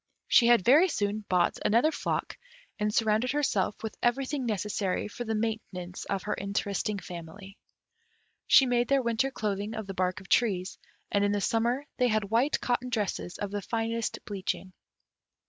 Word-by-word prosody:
She 235 - +6
had 235 -5 +5
very 300 +9 +7
soon 210 -5 -2
bought 180 -2 +2
another 235 +9 +3
flock, - - -2 0.4
and 210 0 +1
surrounded 220 +4 +1
herself 220 -10 0
with 220 - -4
everything 260 +2 0
necessary 210 -2 -1
for 240 +3 -6
the 220 -1 -1
maintenance 215 -5 -4
of 195 -2 -2
her 210 - -1
interesting 200 +1 -2
family. 185 +2 -9 0.9
She 270 - +7
made 245 -1 +1
their 275 -1 +2
winter 235 +3 +1
clothing 210 -3 -3
of 220 -1 -4
the 195 - -6
bark 185 0 -1
of 195 - -14
trees, 195 -6 +1 0.3
and 200 -1 +2
in 205 0 +2
the 205 - +1
summer 235 +7 0
they 250 - +3
had 215 -3 0
white 245 +6 +2
cotton 250 0 -1
dresses 205 -6 -2
of 205 -1 -4
the 205 0 -3
finest 230 +1 -2
bleaching. 190 -2 -4
215 Hz, 165 wpm, -29 LUFS, 200-240 Hz, 0.9 s, very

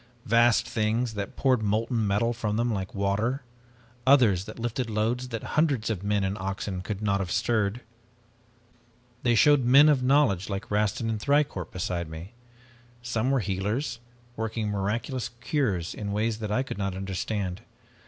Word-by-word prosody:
Vast 115 +1 +4
things 110 +2 0
that 100 -2 -5
poured 130 -4 +2
molten 110 +2 0
metal 105 +4 +1
from 110 -2 -2
them 120 0 +1
like 95 -2 -4
water. 105 +7 0 0.6
Others 115 -9 +5
that 110 - -9
lifted 120 +1 -2
loads 115 +4 -1
that 115 -3 -5
hundreds 140 -8 +2
of 100 -5 -3
men 100 0 0
and 95 +1 -2
oxen 95 0 -3
could 100 +2 -5
not 100 -1 +1
have 95 -3 -3
stirred. 110 +2 0 1.4
"They 120 -1 +2
showed 145 +3 +5
men 140 +5 +7
of 140 -4 +3
knowledge 125 -9 +3
like 100 +2 -5
Rastin 105 +3 0
and 110 -1 -1
Thicourt 140 - +1
beside 85 -2 -3
me. 80 +5 -8 0.7
Some 120 0 -1
were 135 -2 +2
healers, 105 +6 -2 0.4
working 110 -1 -2
miraculous 110 +6 -2
cures 115 - -1
in 105 - -6
a - - -2
way 110 +3 +1
that 110 -1 -4
I 130 +5 +1
could 130 - -7
not 100 -2 -2
understand. 95 0 -3
110 Hz, 165 wpm, -27 LUFS, 100-120 Hz, 1.4 s, men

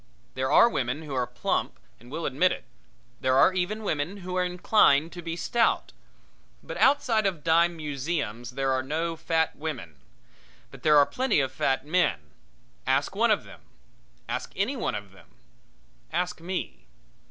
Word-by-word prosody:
There 130 0 -1
are - - +7
women 135 - -2
who 150 -3 -7
are 125 -2 0
plump 125 - -2 0.2
and 120 +2 -16
will 160 +4 -4
admit 150 +7 +2
it; - - -5 0.6
there 130 0 +2
are 160 +7 +6
even 190 +4 -2
women 160 +1 -2
who 185 0 -4
are 185 - +2
inclined 180 -4 +3
to 175 - -8
be 165 -1 -4
stout. 230 +6 +1 0.7
But - - -7
outside 245 -7 +3
of 175 -6 -3
dime 170 +1 +3
museums 140 -6 -3
there 135 -1 +1
are 130 0 +1
no 160 +5 -2
fat 160 0 0
women. 130 - -6 0.7
But - - -13
there 150 -1 +5
are 145 - +7
plenty 255 - +1
of 135 -2 0
fat 135 0 0
men. 145 - 0 0.6
Ask - - +1
one - - +3
of - - +2
them. - - -14 0.7
Ask - - -4
any 210 +9 0
one 235 - -2
of 105 -2 -7
them. 95 - -18 0.8
Ask 180 -2 -2
me. 165 - -5
160 Hz, 165 wpm, -27 LUFS, 130-180 Hz, 0.8 s, are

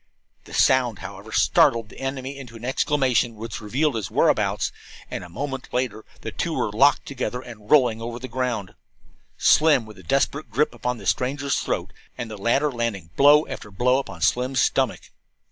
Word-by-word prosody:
The - - -13
sound, 125 -5 +3
however, - - -9
startled 115 -2 +3
the - - -13
enemy 135 0 -4
into 125 -4 -10
an 115 +1 -8
exclamation 130 -3 +1
which 110 +1 -6
revealed 135 +8 0
his 110 -6 -3
whereabouts, - - +2 0.4
and - - -4
a 90 - -10
moment 135 +8 -5
later 125 -4 -2 0.2
the 110 - -5
two 170 +7 -2
were 105 - -1
locked 135 +7 +4
together 130 -2 -3
and 115 -4 -12
rolling 125 -7 +4
over 120 +1 -5
the 125 +2 -7
ground, 120 -6 -3 0.6
Slim 150 -6 +4
with 105 -3 -13
a - - -11
desperate 135 - 0
grip 130 +5 +1
upon 125 +1 -3
the 100 - -11
stranger's 140 +6 0
throat, - - -3 0.2
and 120 -3 -5
the 105 - -6
latter 140 +7 +2
landing 115 -9 -3
blow 145 +2 +6
after 105 - -7
blow 125 +6 +2
upon 95 -11 -7
Slim's 130 +6 +1
stomach. - - 0
125 Hz, 180 wpm, -24 LUFS, 110-135 Hz, 0.6 s, blow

